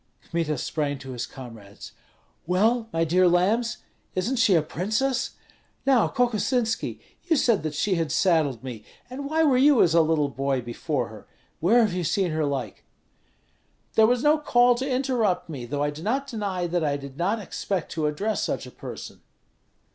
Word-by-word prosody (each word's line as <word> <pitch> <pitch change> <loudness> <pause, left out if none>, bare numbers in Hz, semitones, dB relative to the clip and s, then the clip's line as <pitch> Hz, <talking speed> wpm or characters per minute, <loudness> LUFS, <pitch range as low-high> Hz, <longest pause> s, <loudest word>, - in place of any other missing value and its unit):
Kmita 165 -3 -1
sprang 145 +2 -2
to 135 -1 -9
his 120 -1 -4
comrades. 115 -6 -11 0.6
"Well, 220 +6 +2
my 165 -3 +1
dear 180 +3 +3
lambs, 205 +7 +1 0.3
isn't 230 +9 -1
she 220 -5 +4
a 160 - +3
princess? 220 - -1 0.5
Now, 265 -4 +4
Kokosinski, 240 -2 0 0.3
you 335 -2 +2
said 235 -7 +2
that 155 -1 -4
she 190 +6 +1
had 165 -4 -1
saddled 155 - +2
me, 120 -5 -7 0.3
and 280 +2 -5
why 320 +1 +2
were 270 -5 +4
you 280 -2 +6
as 165 - +2
a 165 - +6
little 155 -2 +1
boy 135 -1 -1
before 120 -1 -3
her? - - -13 0.3
Where 225 +9 +4
have 215 -5 +1
you 180 0 -2
seen 180 +2 0
her 155 -1 0
like?" 140 -3 -4 1.1
"There 220 0 +5
was 245 +1 +1
no 300 +1 +4
call 245 -4 +4
to 260 +3 -3
interrupt 235 -9 0
me; 130 -6 -6
though 145 +3 -2
I 145 - 0
do 150 +1 -9
not 260 +9 -1
deny 205 -8 -3
that 175 -1 -1
I 145 -2 0
did 140 -1 -10
not 195 +6 +1
expect 195 -3 -4
to 155 -2 -1
address 205 +9 -1
such - - -2
a - - -11
person." - - -9
180 Hz, 180 wpm, -25 LUFS, 150-240 Hz, 1.1 s, you